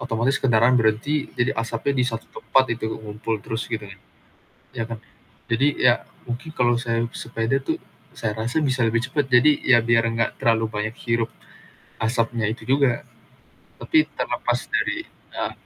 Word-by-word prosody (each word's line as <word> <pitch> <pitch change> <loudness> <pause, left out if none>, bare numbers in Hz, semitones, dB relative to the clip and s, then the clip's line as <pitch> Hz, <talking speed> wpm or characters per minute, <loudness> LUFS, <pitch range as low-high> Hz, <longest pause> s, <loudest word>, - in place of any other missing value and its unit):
otomatis 125 -1 0
kendaraan 120 0 +4
berhenti 115 +7 +1
jadi 120 +2 +2
asapnya 115 +4 -1
di - - +3
satu 115 -2 -3
tempat 130 - +2
itu 110 -1 -4
ngumpul 110 0 -4
terus 115 +1 -3
gitu 110 -2 -3
kan, 95 -1 -12 0.8
ya 115 - -1
kan? 115 -1 -6 0.5
Jadi, 135 +5 +1
ya 125 -1 +4 0.2
mungkin 125 +6 -5
kalau 120 -4 +2
saya 115 -1 -1 0.2
sepeda 115 +3 -1
tuh - - -1 0.3
saya 110 -2 -3
rasa 115 +7 -1
bisa 130 -5 +1
lebih 115 +1 +2
cepet, 140 0 -1
jadi 130 +4 +6
ya 130 -2 +6
biar 115 0 +3
gak 115 0 +1
terlalu 115 -1 +3
banyak 110 +1 -3
hirup 115 -1 +1 0.7
asapnya 115 0 0
itu 115 - -8
juga, 135 -3 +2 0.8
tapi 315 -2 +3
terlepas - - -1
dari, 325 - 0
eee, - - -6
115 Hz, 155 wpm, -23 LUFS, 115-130 Hz, 0.8 s, jadi